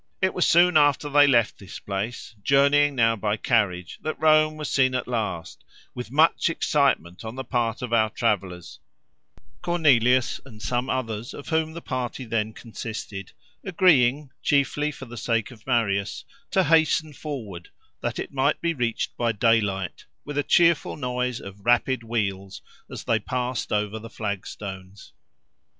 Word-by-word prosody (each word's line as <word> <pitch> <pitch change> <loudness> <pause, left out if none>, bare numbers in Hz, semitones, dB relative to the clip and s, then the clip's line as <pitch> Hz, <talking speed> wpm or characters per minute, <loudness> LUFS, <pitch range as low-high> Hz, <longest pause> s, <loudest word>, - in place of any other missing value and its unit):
It 190 0 +1
was 180 - +2
soon 175 0 +5
after 145 0 +3
they 145 0 +6
left 120 -5 +2
this 100 -1 -9
place, 105 +5 -5
journeying 140 +3 +4
now 115 -2 +3
by 105 0 -1
carriage, 95 -6 0
that 155 - -4
Rome 155 0 +4
was 150 -2 -4
seen 130 -1 +2
at 130 - -2
last, 110 -9 -4 0.3
with 125 -2 -7
much 155 +4 +3
excitement 140 - 0
on 110 +1 -6
the 130 - -5
part 120 -1 -1
of 120 -2 -4
our 110 -2 +3
travellers; 95 -6 -2 0.8
Cornelius, 130 -8 +3
and 115 -5 -14
some 125 +4 -2
others 115 -3 -3
of 145 - -9
whom 160 -1 0
the 170 - -8
party 130 0 -4
then 110 -1 -1
consisted, 110 -3 -7 0.3
agreeing, 150 - +3
chiefly 145 +1 +1
for 135 -2 -10
the 120 -1 -10
sake 115 +1 -1
of 115 -1 -16
Marius, 100 -6 0 0.2
to 190 - +2
hasten 160 -1 +2
forward, 110 - -7 0.3
that - - -3
it - - -5
might 140 +2 +1
be 170 -1 0
reached 120 -5 -2
by 120 -1 +1
daylight, 105 -4 0 0.2
with 145 - -6
a 145 - +2
cheerful 170 +2 +3
noise 125 -2 -2
of 100 0 -11
rapid 120 +2 +2
wheels 100 -4 -3 0.3
as - - -7
they 115 - +1
passed 125 +2 -3
over 105 +1 -1
the 115 +1 -10
flagstones. 100 -2 -7
125 Hz, 155 wpm, -24 LUFS, 110-145 Hz, 0.8 s, they